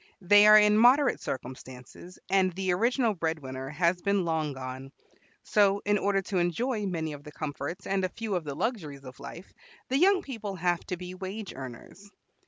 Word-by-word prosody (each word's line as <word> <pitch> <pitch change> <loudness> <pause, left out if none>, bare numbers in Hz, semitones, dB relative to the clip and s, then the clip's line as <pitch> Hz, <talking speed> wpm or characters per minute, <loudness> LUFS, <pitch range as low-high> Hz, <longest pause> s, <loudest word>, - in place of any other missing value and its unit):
They 205 +3 +6
are 215 0 +9
in 210 0 +5
moderate 255 +3 +4
circumstances, 130 +6 -8
and 190 -1 +2
the 190 +1 -1
original 235 +3 +1
breadwinner 145 -7 -4
has 170 +3 0
been 200 -2 +1
long 160 -2 -1
gone; 130 0 -7 0.5
so 200 -1 +2
in 205 0 +2
order 195 -1 +1
to 190 -1 -1
enjoy 210 +6 -1
many 160 -4 -3
of 145 0 -10
the 150 - -10
comforts 150 +4 -5
and 195 -1 0
a 185 - 0
few 220 +2 -5
of 180 -3 -1
the 145 -2 -6
luxuries 150 - -4
of 130 -1 -11
life 180 - -10 0.4
the 265 +2 +1
young 380 +2 +4
people 220 -7 -6
have 175 -1 0
to 180 - -3
be 180 +1 -8
wage 190 +2 -6
earners. 135 +10 -10
185 Hz, 185 wpm, -28 LUFS, 150-205 Hz, 0.5 s, are